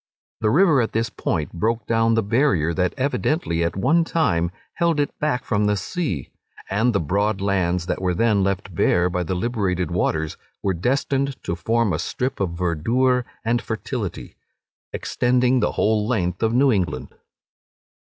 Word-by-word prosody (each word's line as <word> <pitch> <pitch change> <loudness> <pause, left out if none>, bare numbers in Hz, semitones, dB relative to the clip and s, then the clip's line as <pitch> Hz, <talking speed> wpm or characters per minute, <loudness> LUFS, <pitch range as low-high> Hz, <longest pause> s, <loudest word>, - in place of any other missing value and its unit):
The 110 - +1
river 155 - +4
at 115 - -2
this 115 0 0
point 75 - -2
broke 115 +6 -1
down 115 0 +2
the 115 - +2
barrier 100 - +2
that 90 0 0
evidently 140 - 0
at 85 - -1
one 150 - +3
time 85 - +1 0.2
held 170 -3 +1
it 145 - +1
back 150 -5 0
from 105 -2 +1
the 105 0 +1
sea; 100 - -3 0.4
and 110 +5 +2
the 100 - +1
broad 100 +6 0
lands 90 -3 0
that 90 - -2
were 90 -1 0
then 105 0 +2
left 95 -1 -2
bare 90 +2 +2
by 90 - -1
the 90 +2 -2
liberated 90 -4 -1
waters, 80 -3 -1 0.3
were 95 - +1
destined 135 - 0
to 85 - -2
form 110 +4 +1
a - - -1
strip 130 +2 -3
of 85 -4 -2
verdure 120 +10 +1 0.2
and 120 +1 +1
fertility, 110 -3 -5 0.6
extending 125 +1 +1
the - - 0
whole 105 -1 +1
length 90 -7 -1
of 110 - +2
New 130 +3 +4
England. 85 - -1
105 Hz, 165 wpm, -22 LUFS, 90-125 Hz, 0.6 s, river